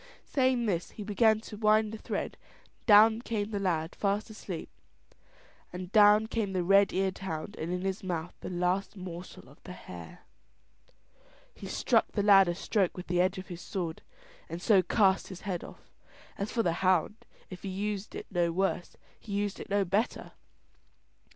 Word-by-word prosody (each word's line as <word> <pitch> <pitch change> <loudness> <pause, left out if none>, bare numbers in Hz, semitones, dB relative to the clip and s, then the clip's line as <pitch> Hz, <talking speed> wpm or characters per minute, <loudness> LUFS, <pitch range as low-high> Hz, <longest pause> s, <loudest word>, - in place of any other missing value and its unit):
Saying 255 -3 +1
this 180 -5 -1
he 210 - -8
began 215 +1 +3
to 215 -1 -9
wind 215 0 +3
the 220 - -6
thread, - - -4 0.4
and - - -36
down 220 +1 +7
came 215 -3 -3
the 205 - -2
lad 170 -4 -1
fast 205 +2 -1
asleep; 190 -6 -6 1.0
and 180 0 -7
down 210 0 +6
came 220 -3 -2
the 185 -1 0
red 195 +2 +5
eared 190 0 -1
hound 175 -1 -5
and 160 +2 -4
in 180 0 -2
his 195 +1 -3
mouth 175 -2 -3
the - - -6
last 185 +3 -1
morsel 180 -5 -9
of 140 +4 -18
the 180 - -9
hare. 85 - -11 1.3
He - - -9
struck - - +1
the 205 - 0
lad 195 -2 +7
a 175 - -1
stroke 195 0 0
with 180 - -6
the 180 0 +1
edge 185 +1 +1
of 185 - -8
his 175 -1 -7
sword, 170 -4 -4 0.5
and 165 - -5
so 195 +1 +4
cast 195 0 +2
his 185 -2 -9
head 185 -5 -3
off. - - -13 0.4
As 200 +2 -4
for 230 - +1
the 170 - +1
hound, 185 +2 +2 0.3
if 180 - -8
he 195 - -5
used 205 +1 -4
it - - -6
no 175 -2 +1
worse, 185 0 -1 0.2
he 205 - -8
used 205 0 -1
it - - -8
no 200 0 +2
better. 200 +6 -1
195 Hz, 185 wpm, -30 LUFS, 180-210 Hz, 1.3 s, down